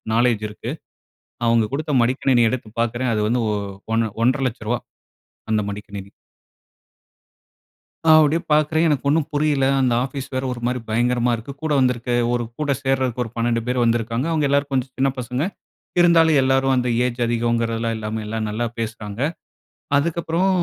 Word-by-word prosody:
Knowledge 115 -3 +2
இருக்கு. 105 - -6 0.8
அவங்க 115 -1 +4
குடுத்த 150 +1 -2
மடிக்கணினிய 120 -1 +3
எடுத்து 115 -3 -4
பாக்குறேன், 120 +1 0
அது 105 - 0
வந்து 120 +1 +1
ஓ - - 0 0.4
ஒன்ன 115 -1 +1
ரூ.1,50,000 120 -3 0 0.7
அந்த 110 -1 +2
மடிக்கணினி. 100 -1 -8 2.0
நா 160 - +4
அப்படியே 155 +3 +2
பார்க்குறேன். 155 +2 +3
எனக்கு 145 -2 0
ஒண்ணும் 150 0 +2
புரியல. 145 -2 +2 0.2
அந்த 125 -2 +2
ஆஃபீஸ் 135 0 -6
வேற 130 - -1
ஒரு 120 - -8
மாரி 125 0 -1
பயங்கரமா 120 +2 +1
இருக்கு. 115 +5 -8
கூட 155 - -1
வந்திருக்க 125 -1 0 0.2
ஒரு 120 -1 0 0.2
கூட 145 -2 0
சேர்றதுக்கு 130 -2 0
ஒரு 115 - -9
12 115 0 +1
பேர் 125 -1 +1
வந்திருக்காங்க. 115 +2 0
அவங்க 150 -3 +1
எல்லாரும் 140 0 +1
கொஞ்சம் 130 0 -1
சின்ன 135 +1 +2
பசங்க. 125 +4 -2 0.6
இருந்தாலும் 165 -3 +5
எல்லாரும் 135 0 +2
அந்த 125 -1 0 0.2
ஏஜ் 125 0 -2
அதிகம்ங்கிறதலாம் 115 -1 0
இல்லாம, 110 0 -4
எல்லாம் 110 0 -2
நல்லா 115 +3 -1
பேசுறாங்க. 110 -1 -5 0.8
அதுக்கப்புறம், 170 +4 0
125 Hz, 150 wpm, -21 LUFS, 115-140 Hz, 2.0 s, இருந்தாலும்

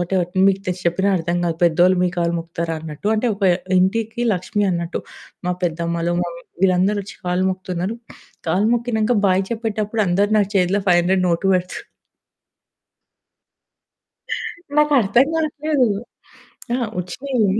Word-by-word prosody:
Whatever. 175 0 0 0.2
మీకు 195 0 +1
తెలిసి 180 0 -3
చెప్పినా 190 +3 0
అర్థం 170 +1 -1
కాదు. 165 -2 -1
పెద్దోళ్ళు 175 +2 +4
మీ - - +2
కాళ్లు 170 0 +1
మొక్కుతారా 165 0 -4
అన్నట్టు. 155 +5 -5
అంటే 230 +3 0
ఒక 200 - -13 0.4
ఇంటికి 225 +5 0
లక్ష్మి 205 +3 -1
అన్నట్టు. 170 0 -3 0.5
మా 180 - +1
పెద్దమ్మలు, 170 0 -1
మమ్మీ 170 -1 -6 0.2
వీళ్ళందరొచ్చి 195 +2 +1
కాళ్ళు 180 +1 +1
మొక్కుతున్నారు. 185 +3 -4 0.5
కాళ్ళు 190 +6 +2
మొక్కినంక 235 -1 0
బాయ్ 190 0 +3
చెప్పేటప్పుడు 220 -1 -1
అందరూ 200 +4 +2
నా 205 - +4
చేతిలో 185 +2 +2
500 180 +1 +3
నోటు 170 +3 0
పెడుతూ 180 0 -2 3.0
నాకర్థం 270 -4 +4
గాట్లేదు. 305 -3 +1 0.9
ఆ! - - +2 0.2
ఒచ్చినయి. 225 +5 -1
185 Hz, 125 wpm, -20 LUFS, 175-215 Hz, 3.0 s, పెద్దోళ్ళు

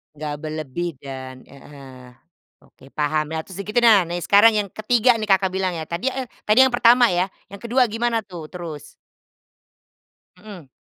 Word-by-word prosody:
Nggak 150 0 -5
berlebih 155 +2 -4
dan, 130 -2 -9
heeh, 135 -2 -14 0.5
oke - - -25
paham 155 +1 -1 0.2
tuh 190 - -11
segitu 210 +4 -1
nah 220 -6 +5
nah 175 +1 -4
sekarang 205 +5 +5
yang 200 - -3
ketiga 235 +4 +2
nih 220 - -4
Kakak 190 0 +3
bilang 190 -1 -1
ya 160 -2 -6
tadi, 175 +11 -2
eh, 260 -1 -5 0.2
tadi 215 +4 +3
yang 250 - -6
pertama 240 0 +5
ya 180 -2 +1 0.2
yang 200 0 -12
kedua 245 +1 +2
gimana 230 +1 -1
tuh 175 -7 -10
terus? 165 -5 -8 1.5
Mhm. 190 -10 -12
185 Hz, 160 wpm, -21 LUFS, 155-225 Hz, 1.5 s, nah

